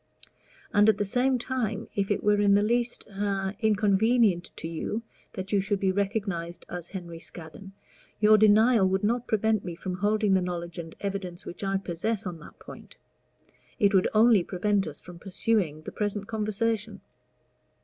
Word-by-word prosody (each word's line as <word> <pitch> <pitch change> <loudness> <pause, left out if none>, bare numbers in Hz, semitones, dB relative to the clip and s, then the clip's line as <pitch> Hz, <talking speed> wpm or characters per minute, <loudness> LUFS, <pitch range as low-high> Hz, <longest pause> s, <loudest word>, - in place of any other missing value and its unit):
And 205 +1 +5
at 220 - +3
the 205 - 0
same 255 +5 +1
time, 235 -4 -3
if 200 -1 -1
it 205 - 0
were 205 0 +3
in 200 -1 +5
the 205 - +3
least 240 +2 0
a 195 -1 -2
inconvenient 215 -2 +2
to 160 - -6
you 170 +7 -4 0.3
that 185 0 -6
you 200 -2 +3
should 200 0 -1
be 190 -1 +2
recognized 195 -4 -2
as 175 -1 -7
Henry 170 -3 -7
Scaddon, 170 +4 -9 0.5
your 215 0 +6
denial 215 0 +5
would 190 +1 0
not 235 +3 0
prevent 220 -1 +1
me 175 -2 -5
from 185 +1 -5
holding 210 +1 +2
the 190 - +3
knowledge 175 -1 -4
and 165 -1 -8
evidence 195 -3 -4
which 175 - -8
I 195 0 +1
possess 195 +4 -3
on 175 -3 -5
that 155 - -14
point; - - -13 0.8
it 200 0 +3
would 190 -1 +4
only 220 -3 +6
prevent 195 +2 0
us 150 - -7
from 175 -1 -12
pursuing 185 -5 -1
the - - -7
present 205 -1 -2
conversation." 215 0 -2
200 Hz, 170 wpm, -27 LUFS, 185-215 Hz, 0.8 s, your